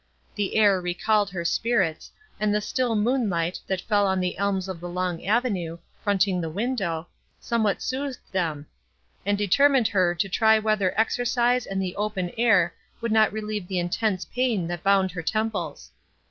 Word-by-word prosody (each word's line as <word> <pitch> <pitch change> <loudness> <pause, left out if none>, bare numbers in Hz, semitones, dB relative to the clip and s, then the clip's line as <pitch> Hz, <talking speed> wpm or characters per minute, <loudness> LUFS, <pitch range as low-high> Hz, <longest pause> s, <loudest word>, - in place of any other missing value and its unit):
The 205 -2 -2
air 205 -4 +4
recalled 200 +4 +1
her 175 -2 -5
spirits, 190 -4 0 0.3
and 210 -1 +1
the - - +3
still 240 +2 -1
moonlight, 210 -7 0
that 190 -2 -1
fell 205 -1 +2
upon 190 0 +1
the 180 -1 -1
elms 195 -2 0
of 185 -3 -6
a 175 - -5
long 180 -1 -3
avenue, 200 -7 0 0.3
fronting 195 -3 +2
the 165 - -3
window, 190 -4 -2 0.3
somewhat 220 -4 0
soothed 265 0 -3
them, 160 -6 -2 0.6
and 205 0 +2
determined 250 +5 +4
her 180 -3 +2
to 175 +4 0
try 220 +3 +4
whether 215 -3 0
exercise 245 +1 +1
and 195 0 -2
the 185 -2 -3
open 200 -4 -2
air 215 -7 +3 0.3
would 230 -1 -2
not 220 -1 +4
relieve 215 -3 -4
the 185 - -2
intense 185 +2 -1
pain 245 -8 0
that 175 0 -4
bound 195 -1 +3
her 175 0 -5
temples. 200 -5 -3
200 Hz, 165 wpm, -25 LUFS, 180-220 Hz, 0.6 s, air